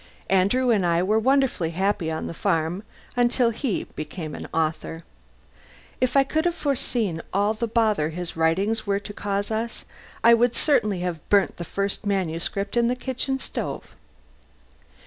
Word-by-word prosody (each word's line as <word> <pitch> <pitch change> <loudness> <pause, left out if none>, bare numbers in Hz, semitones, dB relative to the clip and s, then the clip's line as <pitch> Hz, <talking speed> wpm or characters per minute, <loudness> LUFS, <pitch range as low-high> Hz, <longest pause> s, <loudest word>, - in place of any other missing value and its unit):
Andrew 200 +7 +3
and 205 -5 +3
I 170 0 +2
were 215 +4 +3
wonderfully 260 -8 +2
happy 190 -4 +1
on 160 - -3
the - - -5
farm 165 0 0 0.3
until 245 0 +3
he 230 -1 -2
became 155 0 -7
an - - -6
author. 160 +1 -2 1.0
If 255 +2 +2
I 275 - +7
could 310 +4 0
have 345 -1 +1
foreseen 235 - -1
all 205 +2 +2
the 230 +2 -2
bother 215 -8 +2
his 175 +1 -5
writings 195 +8 +1
were 200 0 +1
to 205 0 -8
cause 200 +1 -2
us, 225 +1 -3 0.4
I 235 - +8
would 240 +1 +3
certainly 210 - +2
have 175 -4 -4
burnt 200 -2 +3
the 175 - -4
first 195 +5 -2
manuscript 195 0 -1
in 235 -1 +3
the 245 - +1
kitchen 265 +1 -2
stove. - - -5
205 Hz, 160 wpm, -24 LUFS, 175-235 Hz, 1.0 s, I